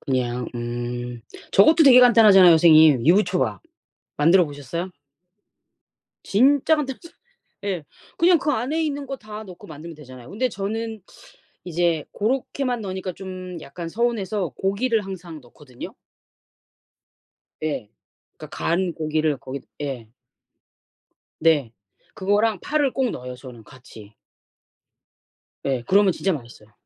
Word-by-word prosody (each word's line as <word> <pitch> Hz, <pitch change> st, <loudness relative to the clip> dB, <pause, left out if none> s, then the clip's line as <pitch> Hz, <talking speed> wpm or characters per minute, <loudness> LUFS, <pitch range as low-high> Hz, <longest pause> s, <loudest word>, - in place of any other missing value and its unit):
그냥 125 Hz, -2 st, -2 dB
음. 120 Hz, 0 st, -5 dB, 0.3 s
저것도 315 Hz, -, +6 dB
되게 250 Hz, -2 st, +8 dB
간단하잖아요 215 Hz, -7 st, +7 dB
선생님. 155 Hz, -5 st, +6 dB
유부초밥. 180 Hz, -, +2 dB, 0.6 s
만들어 170 Hz, +4 st, +5 dB
보셨어요? 150 Hz, +6 st, -6 dB, 1.3 s
진짜 275 Hz, +8 st, +3 dB
간단하죠. 300 Hz, +2 st, -5 dB, 0.6 s
예. 185 Hz, -6 st, -3 dB, 0.4 s
그냥 345 Hz, -1 st, +5 dB
그 300 Hz, -, -1 dB
안에 285 Hz, +7 st, -1 dB
있는 285 Hz, -2 st, -3 dB
거 270 Hz, 0 st, -5 dB
다 215 Hz, -2 st, -9 dB
넣고 180 Hz, -3 st, -13 dB
만들면 160 Hz, +2 st, -10 dB
되잖아요. 130 Hz, -4 st, -13 dB
근데 250 Hz, +5 st, -1 dB
저는 220 Hz, +1 st, -5 dB, 0.6 s
이제 170 Hz, -2 st, 0 dB
고렇게만 250 Hz, +2 st, -2 dB
넣으니까 190 Hz, -2 st, -5 dB
좀 185 Hz, -1 st, -8 dB
약간 165 Hz, +5 st, -8 dB
서운해서 210 Hz, -4 st, -1 dB
고기를 210 Hz, +2 st, 0 dB
항상 180 Hz, -4 st, -8 dB
넣거든요. 125 Hz, +1 st, -12 dB, 1.7 s
예. 135 Hz, -9 st, -3 dB, 0.5 s
그러니까 -, -, -10 dB
간 175 Hz, +1 st, 0 dB
고기를 155 Hz, -2 st, -1 dB
거기다 130 Hz, +2 st, -8 dB
예. 125 Hz, -6 st, -6 dB, 1.3 s
네. 150 Hz, -7 st, +2 dB, 0.4 s
그거랑 205 Hz, +2 st, +1 dB
파를 290 Hz, -, 0 dB
꼭 265 Hz, -2 st, 0 dB
넣어요 125 Hz, 0 st, -7 dB
저는 125 Hz, -3 st, -12 dB
같이. 110 Hz, -5 st, -15 dB, 1.5 s
예. 130 Hz, -3 st, -1 dB
그러면 195 Hz, +4 st, +4 dB
진짜 190 Hz, +2 st, -1 dB
맛있어요. 115 Hz, -5 st, -10 dB
180 Hz, 270 characters per minute, -22 LUFS, 140-220 Hz, 1.7 s, 되게